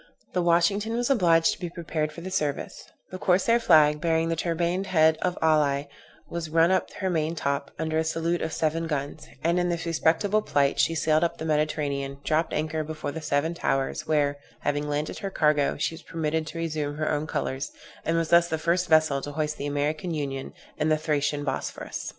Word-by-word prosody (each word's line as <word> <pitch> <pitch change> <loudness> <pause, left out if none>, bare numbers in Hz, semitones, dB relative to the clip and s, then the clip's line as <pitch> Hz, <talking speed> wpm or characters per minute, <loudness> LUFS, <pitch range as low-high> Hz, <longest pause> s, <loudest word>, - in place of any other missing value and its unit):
The 180 - +1
Washington 175 +6 +2
was 245 +3 0
obliged 165 -9 +4
to - - -11
be 175 -1 -4
prepared 160 -3 -3
for 170 - -10
the 185 +2 -6
service; 150 -7 -3 0.2
the 185 - -6
corsair 195 +7 +3
flag, 150 -8 +5
bearing 165 0 +1
the 165 - 0
turbaned 170 +3 -1
head 160 -3 +4
of 180 -1 -1
Ali, 145 -3 +2 0.4
was 170 -2 -5
run 165 +2 +4
up 185 - +2
to - - -16
her 190 - 0
main 160 0 0
top, 140 -2 -2
under 160 0 -1
a - - +1
salute 165 +2 -1
of 160 - -2
seven 165 +1 -1
guns; 145 0 -4 0.2
and 170 +2 +2
in 175 0 +1
this 170 -1 -2
respectable 170 +6 +2
plight 140 -8 +1
she 165 - +3
sailed 155 0 +2
up 170 - 0
the 160 - -5
Mediterranean, 145 -3 -1
dropped 160 +1 +1
anchor 155 +1 -1
before 155 -1 -5
the 160 - -6
seven 150 +2 0
towers, 145 -1 -1
where, 145 -2 +1 0.2
having 145 0 -1
landed 150 +1 -2
her 195 - -3
cargo, 150 -5 +2
she 150 - -1
was 165 - -10
permitted 160 -1 -2
to 165 - -7
resume 155 -3 -2
her 155 0 0
own 150 +1 -1
colors, 140 -2 -2 0.3
and 165 +1 0
was 165 -1 0
thus 170 0 +5
the 160 - -1
first 170 +3 +1
vessel 155 -3 +4
to 145 - -6
hoist 150 0 -2
the 145 - -3
American 150 +4 -1
Union 135 -3 -4 0.3
in 155 +1 +1
the 155 - +3
Thracian 145 -1 -1
Bosphorus. 140 - -4
160 Hz, 205 wpm, -26 LUFS, 150-170 Hz, 0.4 s, flag